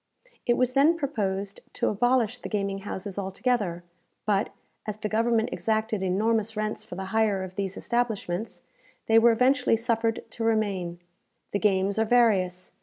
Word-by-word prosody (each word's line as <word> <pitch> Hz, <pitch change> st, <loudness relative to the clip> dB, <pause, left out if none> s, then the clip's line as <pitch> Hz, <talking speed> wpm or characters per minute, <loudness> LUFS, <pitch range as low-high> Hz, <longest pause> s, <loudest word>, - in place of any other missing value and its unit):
It 240 Hz, -, +3 dB
was 255 Hz, 0 st, +1 dB
then 295 Hz, +5 st, +4 dB
proposed 200 Hz, -9 st, -2 dB
to -, -, 0 dB
abolish 245 Hz, +1 st, +1 dB
the -, -, -7 dB
gaming 200 Hz, -2 st, -1 dB
houses 195 Hz, 0 st, -5 dB
altogether; 195 Hz, -2 st, -1 dB, 0.4 s
but, 205 Hz, 0 st, +1 dB, 0.4 s
as 215 Hz, -1 st, -3 dB
the 215 Hz, -, -3 dB
government 230 Hz, +1 st, +2 dB
exacted 220 Hz, -2 st, -1 dB
enormous 215 Hz, +3 st, 0 dB
rents 215 Hz, 0 st, -2 dB
for -, -, -9 dB
the 190 Hz, +1 st, -5 dB
hire 215 Hz, -4 st, +2 dB
of 185 Hz, -1 st, -7 dB
these 195 Hz, 0 st, -3 dB
establishments, 225 Hz, -4 st, -2 dB, 0.4 s
they 225 Hz, 0 st, +6 dB
were 235 Hz, +1 st, +6 dB
eventually 250 Hz, +1 st, +3 dB
suffered 225 Hz, 0 st, 0 dB
to 230 Hz, -, -5 dB
remain. 200 Hz, -6 st, 0 dB, 0.5 s
The 200 Hz, -, 0 dB
games 195 Hz, 0 st, +2 dB
are 220 Hz, -, +3 dB
various. 195 Hz, -6 st, +2 dB
215 Hz, 155 wpm, -27 LUFS, 195-230 Hz, 0.5 s, they